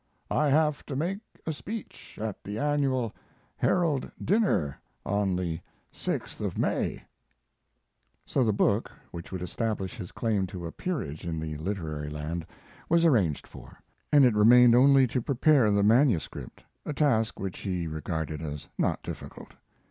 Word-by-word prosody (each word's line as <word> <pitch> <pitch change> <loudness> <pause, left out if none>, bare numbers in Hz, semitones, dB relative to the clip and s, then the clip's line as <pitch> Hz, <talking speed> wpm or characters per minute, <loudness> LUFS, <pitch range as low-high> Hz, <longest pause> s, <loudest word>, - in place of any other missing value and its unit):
I 150 - +2
have 150 +1 +2
to 140 - -4
make 175 +8 -1 0.3
a 160 - -1
speech 215 +8 -8
at 110 -1 -4
the 105 +1 -5
annual 135 -4 0 0.4
Herald 165 -7 +1
dinner 190 - +1 0.3
on 100 -2 +1
the 85 -3 -2 0.3
6th - - -4
of - - -3
May. - - -1 1.2
So 135 - +1
the 110 - +3
book, 105 +1 +1 0.2
which 85 -1 -8
would 90 -2 -4
establish 105 +2 -3
his 95 -6 -7
claim 105 -5 0
to 90 -3 -7
a 80 - -5
peerage 120 - -4
in 80 -2 -3
the 80 -1 -4
literary 75 -4 -4
land, 75 +3 -4 0.4
was 170 +1 +4
arranged 100 - +2
for, - - -13 0.3
and 145 -3 +7
it 125 - +4
remained 120 +3 +7
only 135 +2 +6
to 125 +1 -1
prepare 135 -2 +3
the 100 0 +3
manuscript, 115 - +2 0.2
a 150 - -4
task 120 -7 +1
which 95 -1 -4
he 90 -4 -2
regarded 80 -1 -3
as 75 -2 -6
not - - 0
difficult. - - -8
110 Hz, 150 wpm, -28 LUFS, 85-140 Hz, 1.2 s, and